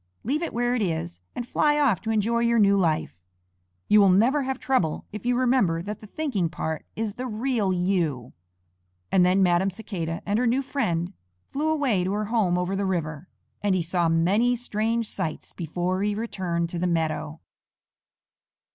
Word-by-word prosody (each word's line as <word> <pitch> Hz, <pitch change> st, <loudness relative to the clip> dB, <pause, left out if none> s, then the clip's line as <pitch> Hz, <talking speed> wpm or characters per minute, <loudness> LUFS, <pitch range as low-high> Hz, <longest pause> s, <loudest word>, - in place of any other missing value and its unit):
Leave 290 Hz, +7 st, 0 dB
it 340 Hz, -, -2 dB
where 240 Hz, +1 st, 0 dB
it 250 Hz, -, 0 dB
is 160 Hz, -, -2 dB
and 245 Hz, -, -4 dB
fly 295 Hz, +3 st, +2 dB
off 265 Hz, -, +2 dB
to 220 Hz, -, -5 dB
enjoy 225 Hz, +2 st, +1 dB
your 235 Hz, 0 st, +2 dB
new 200 Hz, -2 st, +5 dB
life. 155 Hz, -, 0 dB, 0.7 s
You 210 Hz, 0 st, +6 dB
will 200 Hz, -, +6 dB
never 235 Hz, +10 st, +4 dB
have 265 Hz, -1 st, -2 dB
trouble 255 Hz, -, 0 dB
if 210 Hz, +3 st, -6 dB
you 245 Hz, 0 st, +2 dB
remember 240 Hz, -10 st, +2 dB
that 210 Hz, +2 st, -5 dB
the 215 Hz, -, -12 dB
thinking 210 Hz, -, -1 dB
part 160 Hz, 0 st, -4 dB
is 220 Hz, -2 st, -2 dB
the 255 Hz, +3 st, -5 dB
real 225 Hz, -3 st, 0 dB
you." 175 Hz, -9 st, -1 dB, 0.8 s
And 185 Hz, -, +5 dB
then 185 Hz, +2 st, +4 dB
Madam 180 Hz, +1 st, +3 dB
Cicada 175 Hz, -5 st, -5 dB
and 205 Hz, +2 st, +1 dB
her 250 Hz, -, +2 dB
new 255 Hz, +4 st, +2 dB
friend 180 Hz, -10 st, -1 dB, 0.4 s
flew 300 Hz, +3 st, 0 dB
away 275 Hz, -12 st, +1 dB
to 190 Hz, +2 st, -1 dB
her 210 Hz, +1 st, -1 dB
home 205 Hz, -5 st, +1 dB
over 180 Hz, +2 st, -1 dB
the 200 Hz, -, -1 dB
river, 170 Hz, -3 st, -3 dB, 0.3 s
and 205 Hz, -2 st, +2 dB
he 180 Hz, -, 0 dB
saw 170 Hz, 0 st, +1 dB
many 195 Hz, +10 st, +3 dB
strange 230 Hz, -1 st, -1 dB
sights 165 Hz, -8 st, -4 dB
before 175 Hz, +3 st, -2 dB
he 205 Hz, 0 st, 0 dB
returned 180 Hz, -6 st, -2 dB
to 175 Hz, -, -4 dB
the 180 Hz, -, 0 dB
meadow. 160 Hz, -2 st, -1 dB
195 Hz, 180 wpm, -25 LUFS, 175-235 Hz, 0.8 s, You